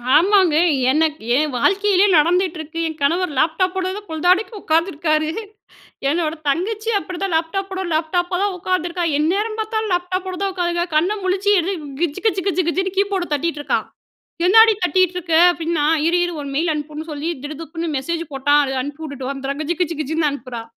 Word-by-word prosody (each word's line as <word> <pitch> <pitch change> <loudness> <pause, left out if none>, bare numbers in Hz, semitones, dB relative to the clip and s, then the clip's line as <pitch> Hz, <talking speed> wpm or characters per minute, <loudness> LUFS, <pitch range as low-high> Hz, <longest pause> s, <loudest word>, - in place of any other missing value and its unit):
ஆமாங்க. 370 -1 +4 0.4
எனக்கு 310 0 +1 0.2
என் 300 -2 0
வாழ்க்கையிலயே 395 - +3
நடந்துட்டுருக்கு. 330 -1 0
என் 315 -1 -7
கணவர் 340 +4 +1
லேப்டாப்போட 370 +4 +1
தான் 415 0 -9
பொழுதாடிக்கு 360 +8 +1
உட்காந்துருக்காரு. 315 -1 +1 0.8
என்னோட 320 +1 0
தங்கச்சியும் 425 +7 0
அப்படி 355 +1 -7
தான், 365 -4 -1
லேப்டாப்போட 380 +3 -2
லேப்டாப்பா 350 +3 0
தான் 405 -2 0
உட்கார்ந்துருக்கா. 350 -1 -1
எந்நேரம் 410 +8 0
பார்த்தாலும் 435 -2 -2
லேப்டாப்போட 370 +1 -2
தான் 390 - 0
உட்காந்துருக்கா. 345 -1 -1
கண்ண 355 +7 +3
முழிச்சு 390 +2 +1
என்ன, 380 +4 -2 0.3
கிஜ்ஜு, 345 +1 -1
கிஜ்ஜு, 385 -3 +1
கிஜ்ஜு, 370 0 +1
கிஜ்ஜுன்னு 380 +2 -1
கீபோர்ட 395 -3 0
தட்டிட்டுருக்கா. 295 0 -1 0.7
"என்னாடி 445 +3 +7
தட்டீட்டுருக்க?" 360 -2 +1 0.2
அப்படின்னா, 330 -3 -1 0.2
இரு, 350 +1 +3
இரு 350 - -5
ஒரு 280 - -6
மெயில் 320 +3 +1
அனுப்புன்னு 300 +2 -6
சொல்லி, 295 +2 -4 0.2
"திடுதிப்புன்னு 325 +3 -5
மெசேஜ் 335 +4 -3
போட்டான். 290 +2 +3
அதை 270 -1 -3
அனுப்பிவுட்டுட்டு 285 -2 -6
வந்துர்றேன்." 275 +2 -5
கிஜ்ஜு, 335 +3 -2
கிஜ்ஜு, 335 -2 0
கிஜ்ஜுன்னு 310 0 0
அனுப்புறா. 245 -4 -6
340 Hz, 150 wpm, -20 LUFS, 310-375 Hz, 0.8 s, என்னாடி